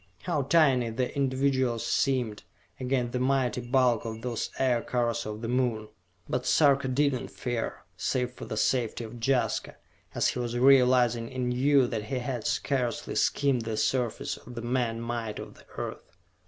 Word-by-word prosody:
How 170 -5 0
tiny 135 -4 +3
the 125 +5 -2
individuals 130 -3 +1
seemed, 125 -6 0 0.4
against 125 -2 0
the 125 - -1
mighty 130 -2 +1
bulk 125 -1 +2
of 110 0 -6
those 120 -3 -2
Aircars 120 -2 0
of 105 0 -6
the - - -2
Moon! 120 -3 0 0.4
But - - -2
Sarka 140 -3 +4
did 140 +2 +2
not 125 - -4
fear, 120 -2 -4
save 125 -1 -1
for - - -9
the 110 - -5
safety 120 +1 0
of 115 +1 -9
Jaska, 130 0 0 0.4
as - - +2
he - - -3
was 120 0 -2
realizing 125 -3 +4
anew 130 +2 +2
that 110 -3 -3
he 135 +1 -3
had 125 -2 -3
scarcely 125 -5 -1
skimmed 140 -4 +2
the 110 -1 -3
surface 125 -2 -1
of 125 - -12
the 115 - -5
man 120 -2 -1
might 115 -2 -3
of - - -8
the - - -19
Earth. - - -7
125 Hz, 165 wpm, -28 LUFS, 115-130 Hz, 0.4 s, Sarka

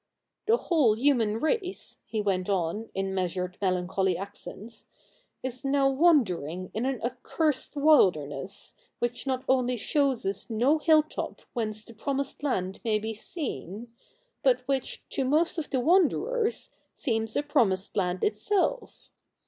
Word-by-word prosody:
The 455 +2 +5
whole 290 - +3
human 230 -4 +2
race,' 365 - -1
he 220 - -1
went 190 -2 0
on 195 +3 -1
in 195 0 -1
measured 180 -1 -2
melancholy 185 0 +1
accents, 205 +3 -8 0.6
'is 255 +1 -4
now 275 0 +3
wandering 185 - +2
in 230 +5 -1
an 265 -3 -1
accursed 260 +5 -1
wilderness, 185 - +2 0.2
which 240 +3 -3
not 260 -1 -1
only 250 -1 +2
shows 275 0 +1
us 195 +4 -3
no 250 +8 +2
hilltop 310 0 +1
whence 215 -3 -3
the 230 - -12
promised 275 +5 -3
land 190 -10 -1
may 220 -2 +2
be 220 +1 -4
seen, 230 - -6 0.5
but - - +2
which, 270 -2 -2
to 270 - -1
most 315 +6 +2
of 305 - -5
the 265 - 0
wanderers, 390 - +2 0.2
seems 225 -5 -1
a 290 - +1
promised 200 -9 +1
land 180 -2 0
itself. 390 - -1
240 Hz, 135 wpm, -28 LUFS, 195-285 Hz, 0.6 s, The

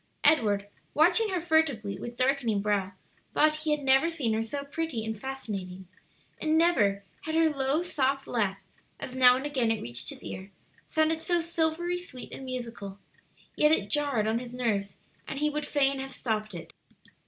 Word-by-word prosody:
Edward, 210 -10 +4 0.3
watching 355 +8 +4
her 370 -2 0
furtively, 315 -12 +1
with 240 0 -7
darkening 255 -5 +1
brow, 200 -2 0 0.4
thought 305 0 +4
he 310 0 -3
had 300 -1 +1
never 270 +4 +5
seen 280 -10 -1
her 220 - 0
so 280 +6 -4
pretty 280 -5 -3
and 220 -1 -4
fascinating, 195 -9 -6 0.5
and 315 0 +2
never 210 - +3 0.2
had 315 0 -2
her 325 -1 +4
low 275 +3 +1
soft 275 -5 0
laugh, 205 -5 0 0.4
as 255 - -6
now 250 -1 +7
and 265 +2 -3
again 265 -6 +1
it 225 -1 +1
reached 120 +2 -4
his - - -7
ear, 190 +1 -7 0.4
sounded 315 0 +1
so 345 +1 +2
silvery 335 +1 0
sweet 260 -8 -9
and 265 - -7
musical, 235 -6 -6 0.6
yet 300 - +4
it 205 -10 +1
jarred 280 -8 +2
on 225 +1 +1
his 245 0 -8
nerves, 205 -6 -1 0.3
and 275 - -5
he 300 +1 +1
would 300 0 -3
fain 275 -2 +2
have 270 0 -5
stopped 215 -6 -3
it. 170 - -9
265 Hz, 175 wpm, -28 LUFS, 220-310 Hz, 0.6 s, now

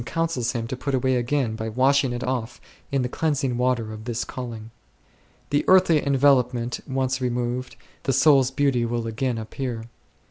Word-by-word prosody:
counsels 135 -4 -1
him 115 -2 -2
to 125 - -4
put 135 +2 -2
away 130 0 +1
again 125 -1 0
by 110 0 -4
washing 130 +3 +3
it 120 +1 -4
off 125 -2 -3 0.3
in 135 -2 +1
the - - 0
cleansing 135 -2 -1
water 120 -3 0
of 110 0 -9
this 120 -1 -2
calling1. 115 -3 -7 0.8
The 145 - +2
earthly 185 -5 +5
envelopment 125 -3 +2
once 130 -1 -1
removed, 125 0 -2 0.3
the - - 0
soul's 135 -1 +5
beauty 135 -3 +1
will 120 0 -2
again 115 +2 -2
appear. 115 +1 -4
125 Hz, 165 wpm, -24 LUFS, 120-135 Hz, 0.8 s, earthly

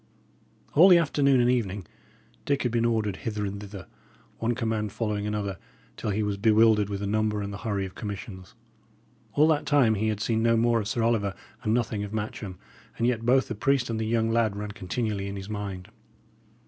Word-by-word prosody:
All 170 +6 +8
the 180 - +8
afternoon 140 -4 +3
and 120 +1 +4
evening, 105 -6 -1 0.6
Dick 140 -1 +1
had 125 - 0
been 115 0 +1
ordered 110 -4 0
hither 105 -3 -3
and 100 +1 -5
thither, 100 -2 -9 0.5
one 115 +1 0
command 110 -4 -1
following 105 -1 -2
another, 100 -3 -3 0.4
till - - -4
he 105 +1 0
was 105 -1 -1
bewildered 110 -1 +4
with 100 -1 -4
the - - -2
number 105 +1 0
and 100 0 -5
the 100 - -6
hurry 100 -3 -2
of 95 - -8
commissions. 100 -2 -7 0.8
All 150 +2 +5
that 150 -2 +1
time 140 -6 +4
he 110 +1 0
had 105 -2 -1
seen 110 +1 0
no 115 0 +3
more 115 0 +3
of 105 - -3
Sir 115 +1 -1
Oliver, 105 -4 +1 0.3
and 110 -4 -1
nothing 110 -4 -1
of 105 +1 -7
Matcham; 105 -3 -5 0.4
and 115 - 0
yet 120 -2 0
both 130 +2 +4
the - - -3
priest 125 +2 +1
and 110 - -2
the 110 - -1
young 115 0 +1
lad 115 -3 +2
ran 105 0 -5
continually 100 +1 -3
in 100 - -5
his 95 +1 -7
mind. 100 -3 -5
110 Hz, 205 wpm, -27 LUFS, 100-115 Hz, 0.8 s, All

